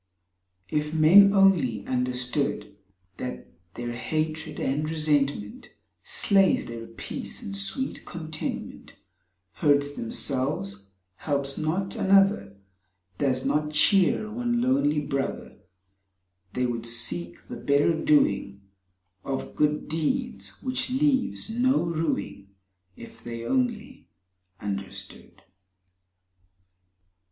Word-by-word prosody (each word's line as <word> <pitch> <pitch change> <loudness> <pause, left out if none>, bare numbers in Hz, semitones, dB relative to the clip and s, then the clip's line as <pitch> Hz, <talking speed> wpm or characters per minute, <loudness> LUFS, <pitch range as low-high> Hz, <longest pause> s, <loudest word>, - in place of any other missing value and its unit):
If 150 +1 -1
men 185 +6 +8
only 170 - +3
understood 125 -2 -1 0.4
That 125 - -5 0.3
their 120 0 -4
hatred 155 +5 -3
and 150 +3 -1
resentment 145 -8 0 0.3
Slays 195 -1 +3
their 115 -1 -7
peace 115 - -6
and 100 - -5
sweet 100 - -1
contentment 160 -2 -6 0.6
Hurts 145 - +2
themselves, 115 -6 -1 0.3
helps 140 -2 -2
not 180 +5 -2
another, 195 - +3 0.6
Does 130 -2 0
not 150 0 +1
cheer 190 +7 +4
one 240 +1 -1
lonely 240 - +2
Brother, 140 -2 -4 0.9
They 125 0 0
would 115 -1 -3
seek 90 -7 -1
the - - -7
better 145 +3 +2
doing 100 -11 +1 0.6
Of 135 -1 -4
good 150 0 +1
deeds 245 - -3
which 255 0 -2
leaves 265 0 +1
no 245 +4 +2
rueing 160 -11 -2 0.3
— 90 0 -45
If 115 - -18
they 115 -1 -6
only 245 - -2 0.5
understood. 100 -1 -7
150 Hz, 95 wpm, -26 LUFS, 120-190 Hz, 0.9 s, men